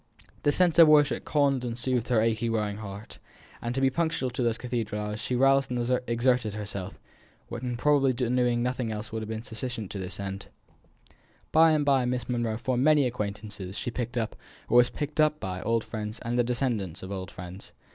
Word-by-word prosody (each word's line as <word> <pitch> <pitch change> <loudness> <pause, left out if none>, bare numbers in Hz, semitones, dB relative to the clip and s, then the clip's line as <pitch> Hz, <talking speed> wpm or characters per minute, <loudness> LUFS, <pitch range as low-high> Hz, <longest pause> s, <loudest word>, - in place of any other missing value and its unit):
The 145 - +3
sense 170 +1 +3
of 165 - +10
worship 145 -4 +4
calmed 140 -4 +2
and 120 -1 -3
soothed 125 -1 -1
her 120 -4 +3
aching 115 +1 +1
weary 105 -2 0
heart, 100 0 -8 0.4
and 120 +1 -3
to 135 - 0
be 135 0 +4
punctual 160 -4 -1
to 125 - -3
the 115 -2 +2
cathedral 115 -4 -3
hours 105 0 -4
she 125 +1 -2
roused 135 +2 +4
and 125 0 0
exerted 120 -2 +1
herself, 100 -3 -6 0.5
when 120 0 -4
probably 140 0 +3 0.4
nothing 120 -1 -1
else 105 0 -5
would 110 0 -3
have 110 - -6
been 110 0 -4
sufficient 115 -3 -5
to 100 - -5
this 90 0 -5
end. 95 0 -5 1.0
By 160 +1 +6
and 150 -2 +1
by 135 -3 +3
Miss 125 -1 -2
Monro 120 -3 -1
formed 125 +1 0
many 150 -2 +5
acquaintances; 105 -4 -4
she 120 - -3
picked 120 0 -4
up, 115 -2 -1 0.3
or 120 - +4
was 120 0 +6
picked 150 +1 -2
up 155 0 +2
by, 90 -1 -4
old 115 +3 +1
friends, 110 0 -5
and 120 0 -2
the 120 - +3
descendants 115 - -1
of 95 - -7
old 95 -1 -5
friends. 90 +1 -10
120 Hz, 195 wpm, -27 LUFS, 105-130 Hz, 1.0 s, of